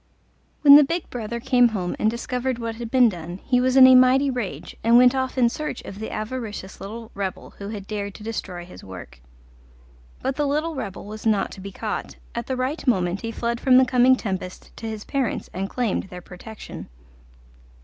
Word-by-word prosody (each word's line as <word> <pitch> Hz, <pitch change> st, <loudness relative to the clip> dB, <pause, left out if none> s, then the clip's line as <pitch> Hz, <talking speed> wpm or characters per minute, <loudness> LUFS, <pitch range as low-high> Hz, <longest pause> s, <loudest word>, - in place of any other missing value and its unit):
When 285 Hz, -1 st, +11 dB
the 295 Hz, -, +7 dB
big 335 Hz, +5 st, -2 dB
brother 235 Hz, -1 st, -4 dB
came 245 Hz, 0 st, +4 dB
home 190 Hz, -6 st, -3 dB
and 215 Hz, -, +3 dB
discovered 250 Hz, +2 st, -2 dB
what 230 Hz, -1 st, -5 dB
had 235 Hz, -1 st, -6 dB
been 250 Hz, 0 st, +5 dB
done 175 Hz, -3 st, -5 dB
he 250 Hz, -2 st, +2 dB
was 255 Hz, 0 st, +1 dB
in 260 Hz, -, +10 dB
a 260 Hz, -, +8 dB
mighty 255 Hz, +2 st, +5 dB
rage, 245 Hz, -6 st, -5 dB
and 230 Hz, +1 st, +6 dB
went 250 Hz, +1 st, +6 dB
off 260 Hz, 0 st, -2 dB
in 245 Hz, -2 st, +5 dB
search 300 Hz, +2 st, -4 dB
of 195 Hz, -, -9 dB
the 220 Hz, -, -5 dB
avaricious 215 Hz, -4 st, -6 dB
little 225 Hz, +3 st, -8 dB
rebel 195 Hz, -2 st, -5 dB
who 200 Hz, 0 st, -6 dB
had 205 Hz, -3 st, -6 dB
dared 200 Hz, -1 st, -5 dB
to 210 Hz, -, -11 dB
destroy 185 Hz, -6 st, -5 dB
his 180 Hz, -, -13 dB
work. 90 Hz, -9 st, -11 dB, 1.0 s
But 265 Hz, 0 st, -1 dB
the 295 Hz, -1 st, +1 dB
little 305 Hz, +4 st, -1 dB
rebel 215 Hz, -9 st, -6 dB
was 215 Hz, +2 st, -6 dB
not 205 Hz, -3 st, +1 dB
to 190 Hz, -, -10 dB
be 195 Hz, +1 st, -7 dB
caught; -, -, -5 dB, 0.2 s
at 235 Hz, -1 st, -4 dB
the 260 Hz, -, -2 dB
right 265 Hz, +4 st, -3 dB
moment 185 Hz, -5 st, +1 dB
he 230 Hz, -, -4 dB
fled 235 Hz, +1 st, -2 dB
from 255 Hz, -1 st, +5 dB
the 260 Hz, -, +6 dB
coming 255 Hz, 0 st, +5 dB
tempest 190 Hz, -6 st, -6 dB
to 225 Hz, -, -6 dB
his 215 Hz, -1 st, -6 dB
parents 270 Hz, -5 st, -2 dB
and 195 Hz, +1 st, -3 dB
claimed 240 Hz, -5 st, -1 dB
their 180 Hz, -2 st, -9 dB
protection. 205 Hz, +5 st, -10 dB
230 Hz, 205 wpm, -23 LUFS, 200-255 Hz, 1.0 s, When